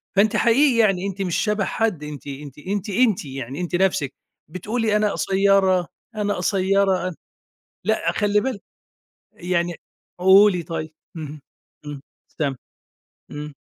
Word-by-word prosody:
فأنتِ 205 +2 +3
حقيقي 245 +2 +4
يعني 195 -4 +2
أنتِ 195 0 -5
مش 180 -3 -1
شبه 210 -2 0
حد، 210 -9 -1
أنتِ 150 -1 -8
أنتِ 140 -1 -8
أنتِ، 200 +4 -3
أنتِ 215 -4 +2
يعني، 135 +3 -6
أنتِ 175 0 -2
نفسِك 175 -7 +1 0.3
بتقولي 215 +6 -1
"أنا 210 -1 +2
قصيرة، 190 -2 +2 0.3
أنا 205 -1 0
قصيرة، 195 0 +2
أنا"، 180 - -5 0.7
لأ، 220 - +1
خلّي 210 -1 +2
بالِك، 250 -5 -3 0.7
يعني 175 -1 -1 0.4
قولي 190 0 +6
طيب 160 -1 -5 0.3
اهم، 150 -2 -7 0.5
إمم، 145 -1 -6 0.4
تم 140 -3 0 0.8
إمم. 150 0 -7
190 Hz, 130 wpm, -22 LUFS, 160-205 Hz, 0.8 s, قولي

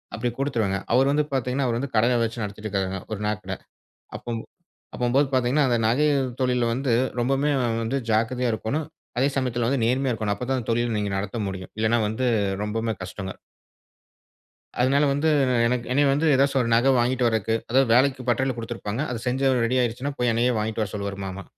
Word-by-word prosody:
அப்டி 120 +3 -1
கொடுத்துருவேங்க. 110 -8 0
அவர் 135 +3 +4
வந்து 150 +1 +2
பார்த்தீங்கன்னா 130 +1 0
அவர் 115 -1 0
வந்து 135 +1 -4
கடையை 120 +3 +3
வச்சு 115 +1 -3
நடத்திக்கிட்டு 105 0 -4
இருக்றாருங்க 95 -1 -3
ஒரு 105 - -4
நகைகட. 105 -2 -3 0.6
அப்பம்போ 115 -1 -5 0.5
அப்பம்போது 130 +3 +2
பார்த்தீங்கன்னா 130 +3 +2
அந்த 120 - +2
நகை 130 +7 +3 0.3
தொழில்ல 125 -1 +1
வந்து 130 +1 -2 0.3
ரொம்பம்மே 135 +4 +1 0.3
வந்து 120 +5 -1
ஜாக்கிரதையாக 115 +2 +1
இருக்கோனும். 135 +8 -2 0.3
அதே 135 +2 +3
சமயத்ல 125 -3 0
வந்து 135 -3 0
நேர்மையா 130 +2 +1
இருக்கோனும். 105 -2 -1
அப்ப 125 - -5
தான் 125 -4 -2
தொழில 120 0 0
நீங்க 105 -1 -2
நடத்த 105 +3 -4
முடியும். 95 -1 -7
இல்லைன்னா 110 +2 +2
வந்து 120 +4 -1 0.4
ரொம்பம்மே 110 +1 -2
கஷ்டங்க. 95 +1 -6 1.5
அதனால 140 +3 +3
வந்து 145 +3 0 0.4
என்க் 120 0 0
என்னய 145 +3 +3
வந்து 150 +4 +1
ஏதாச்சு 140 +1 +2
ஒரு 115 - -1
நகை 125 +4 +4
வாங்கிட்டு 125 +1 +1
வறக்கு. 110 -1 0
அதாது 130 +3 +4
வேலைக்கு 130 +1 +3
பட்டறையில 130 +2 +1
குடுத்திருப்பாங்க. 115 +1 -4
அத 120 - -3
செஞ்சு 135 +2 +2
ரெடி 125 - 0
ஆயிடுச்சுனா. 125 +4 -2
போய் 125 -1 +2
என்னையே 120 +2 +2
வாங்கிட்டு 110 +1 -2
வர 100 - -5
சொல்வாரு 100 -1 -4
மாமா. 95 0 -6
120 Hz, 175 wpm, -24 LUFS, 110-130 Hz, 1.5 s, அவர்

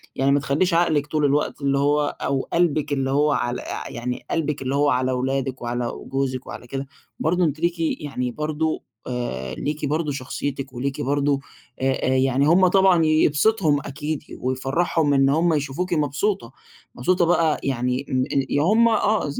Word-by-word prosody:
يعني 135 +1 +2
ما 140 - +4
تخلّيش 145 +7 0
عقلِك 160 -4 +2
طُول 150 0 0
الوقت 145 +1 0
اللي 140 0 +1
هو، 145 +1 +1
أو 135 -1 0
قلبِك 155 -4 +1
اللي 135 -1 0
هو 145 +2 +3
على 120 -3 -1
أ - - -6
يعني 125 +1 -5
قلبِك 150 -4 -1
اللي 135 +1 -1
هو 145 +1 +3
على 130 0 +1
ولادِك، 130 +1 -2
وعلى 120 0 -2 0.2
جوزِك، 130 -1 -2
وعلى 120 - -8
كده، 135 +2 -5 0.3
برضه 180 +3 +1
أنتِ 155 -1 -1
ليكِ 170 +1 0
يعني 140 -6 -2
برضه 155 +3 -2 0.2
آآ 120 - -4
ليكِ 150 +1 -3
برضه 150 +1 -1
شخصيتِك، 135 0 -4
وليكِ 135 +4 -3
برضه 145 0 +1 0.4
آآ 135 0 0
يعني 135 +2 +2
هُم 185 +3 +5
طبعًا 185 -3 +4
يبسطهم 155 +1 +3
أكيد، 150 +2 -4 0.2
ويفرحهم 140 +4 0
إن 135 0 +4
هُم 165 +4 +2
يشوفوكِ 150 +5 -2
مبسوطة، 145 - -1 0.4
مبسوطة 175 +8 +2
بقى 165 -2 +2
يعني 125 0 -1
م 130 0 +1 0.3
يا 145 - +1
هُم 220 +8 +4
آه 215 -6 +1
ز 140 - -4
145 Hz, 165 wpm, -23 LUFS, 135-160 Hz, 0.4 s, هُم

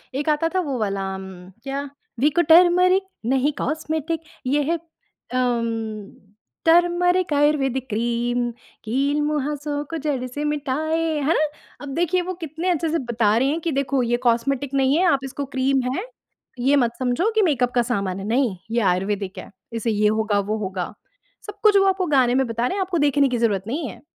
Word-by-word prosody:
एक 290 +3 -1
आता 305 +2 +2
था - - +3
वो 280 -7 -3
वाला 200 -2 -1
अम, 190 0 -7 0.4
क्या 275 +1 -4 0.3
विको 300 +6 +3
टरमरिक 360 +3 +6 0.2
नहीं 265 +4 +2
कॉस्मेटिक 315 +1 -2 0.3
ये 290 +3 +2
है - - +2
अम, 230 -9 -4 0.5
टरमरिक 350 +1 +3
आयुर्वेदिक 275 -3 +1
क्रीम, 240 +2 0 0.4
कील-मुहासों 290 +3 -1
को 330 - -2
जड़ 285 -4 -2
से 290 +4 -5
मिटाए, 300 +2 -1 0.2
है 290 +3 +2
ना? 310 - +2 0.3
अब 285 -1 -6
देखिए 350 +2 +1
वो 365 +1 -4
कितने 320 +5 -3
अच्छे 335 -2 0
से 330 +1 0
बता 220 -2 +2
रहे 260 +3 +2
हैं 310 +3 -1
कि 330 - -1
देखो 275 -1 0
ये 240 - +3
कॉस्मेटिक 255 +4 0
नहीं 270 +2 +3
है 365 - +3
आप 275 - +1
इसको 280 +1 -5
क्रीम 265 +1 +2
है, 375 - -3 0.5
ये 270 +4 +3
मत 245 -4 +2
समझो 255 - +1
कि 440 - +4
मेकअप 255 -8 +1
का 245 - +4
सामान 195 -6 -2
है, 195 - -6
नहीं 235 -2 +1 0.2
ये 235 +1 +1
आयुर्वेदिक 195 +1 -1
है, - - -10 0.2
इसे 230 0 -1
ये 210 0 +2
होगा 215 -1 +1
वो 210 +2 -2
होगा। 190 -4 -4 0.5
सब 415 0 -9
कुछ 420 -2 +6
वो 390 - +4
आपको 380 -1 +1
गाने 260 -5 +3
में 265 0 +3
बता 230 +1 -1
रहे 375 - -2
हैं 400 - -1
आपको 370 -2 -1
देखने 285 -1 +3
की 245 - -1
ज़रूरत 210 -5 +1
नहीं 285 +5 -2
है। - - -12
275 Hz, 185 wpm, -22 LUFS, 235-315 Hz, 0.5 s, टरमरिक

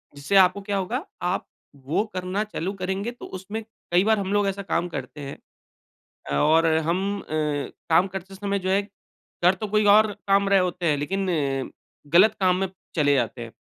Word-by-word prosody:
जिससे 145 +7 -2
आपको 185 +2 +2
क्या 200 -1 0
होगा, 235 - -2 0.2
आप - - -1 0.3
वो 140 +8 -1
करना 185 +3 -2
चालू 195 -3 -4
करेंगे 195 +3 -3
तो 245 - -11
उसमें 205 +4 -6 0.3
कई 175 +2 +4
बार 220 0 +3
हम 195 -1 -3
लोग 205 -1 +2
ऐसा 195 0 -2
काम 175 -2 -1
करते 140 -1 -7
हैं। 140 0 -7 0.9
अ, - - 0
और 160 - +4 0.2
हम 195 +4 0
अ, - - -16 0.6
काम 170 +4 +4
करते 195 0 -8
समय 200 0 -2
जो 185 0 -3
है, 195 +1 +3 0.6
कर 180 +2 +6
तो 215 +3 -5
कोई 210 +1 +2
और 215 0 +4 0.2
काम 200 0 +3
रहे 200 -1 +5
होते 180 -1 -1
हैं, 150 -3 +2
लेकिन 190 +7 -2
अ, 140 -5 -1 0.4
गलत 190 +6 +6
काम 185 -2 +3
में 195 - 0 0.3
चले 145 -3 +3
जाते 120 -1 -1
हैं। 115 -1 -7
190 Hz, 195 wpm, -24 LUFS, 165-200 Hz, 0.9 s, कर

